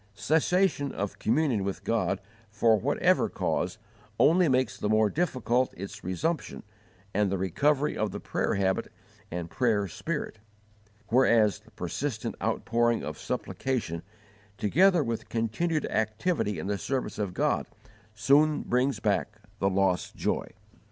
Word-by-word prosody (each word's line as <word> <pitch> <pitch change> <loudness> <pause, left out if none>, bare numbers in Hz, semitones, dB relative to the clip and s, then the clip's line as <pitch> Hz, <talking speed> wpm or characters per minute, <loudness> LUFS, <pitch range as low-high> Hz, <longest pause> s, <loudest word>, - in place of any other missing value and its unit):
Cessation 160 - +2
of 100 0 -4
communion 120 -3 +1
with 100 0 -4
God, 110 -4 0 0.3
for 110 +2 +3
whatever 105 - +2
cause, 90 +3 -1 0.4
only 175 +3 +5
makes 130 -5 +1
the 105 +1 -2
more 110 -1 +3
difficult 130 - 0
its 100 +3 -7
resumption 150 - -2 0.5
and 100 -1 +1
the 95 - 0
recovery 140 - +1
of 110 0 0
the - - -6
prayer - - -1
habit 95 -1 0 0.4
and 85 -1 -5
prayer 110 -5 +1
spirit; 150 - -4 0.7
whereas 115 -4 +4
the 110 +1 -21
persistent 110 - -3
outpouring 120 0 +1
of - - -6
supplication, 115 -11 -3 0.6
together 175 - +4
with 115 -3 -4
continued 120 +9 -1
activity 110 - 0
in 80 - -5
the 100 0 -1
service 130 -2 -3
of 100 -4 -2
God, - - +1 0.5
soon 145 +8 +3
brings 130 +3 +1
back 105 0 0 0.2
the 100 - +2
lost 95 -2 0
joy. - - -1
110 Hz, 130 wpm, -28 LUFS, 100-140 Hz, 0.7 s, only